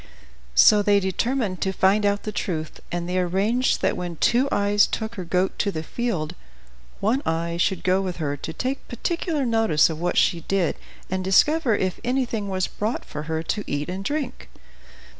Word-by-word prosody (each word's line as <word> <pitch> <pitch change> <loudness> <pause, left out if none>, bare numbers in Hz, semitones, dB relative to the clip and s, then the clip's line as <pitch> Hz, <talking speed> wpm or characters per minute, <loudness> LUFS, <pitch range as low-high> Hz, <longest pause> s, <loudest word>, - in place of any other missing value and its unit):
So 210 - +7
they 205 0 +4
determined 200 +1 -1
to 190 - +1
find 195 +2 +3
out 205 0 0
the 215 - -3
truth, 160 -6 -4
and 175 0 -3
they 180 +1 0
arranged 200 +8 +1
that - - +2
when 175 -1 -4
Two 250 - +2
Eyes 205 +1 +3
took 220 0 -3
her 190 -5 -5
goat 180 +2 0
to 200 - +1
the 155 -3 -4
field, 180 -6 -2 0.7
One 235 +7 +1
Eye 170 +1 -1
should 185 +1 0
go 185 +1 +2
with 185 -2 -4
her 145 -4 -2
to 145 - -6
take 260 +10 -3
particular 315 - -2
notice 225 -10 +3
of 155 - -6
what 175 +1 -1
she 170 - +3
did, 185 0 0 0.4
and 185 0 -1
discover 240 - +3
if 185 -2 -1
anything 240 -5 -1
was 185 -1 0
brought 215 +3 -3
for 150 - -6
her 160 0 -1
to 210 +5 -2
eat 145 +2 -2
and 190 +2 -4
drink. 285 +2 -3
195 Hz, 185 wpm, -24 LUFS, 175-225 Hz, 0.7 s, So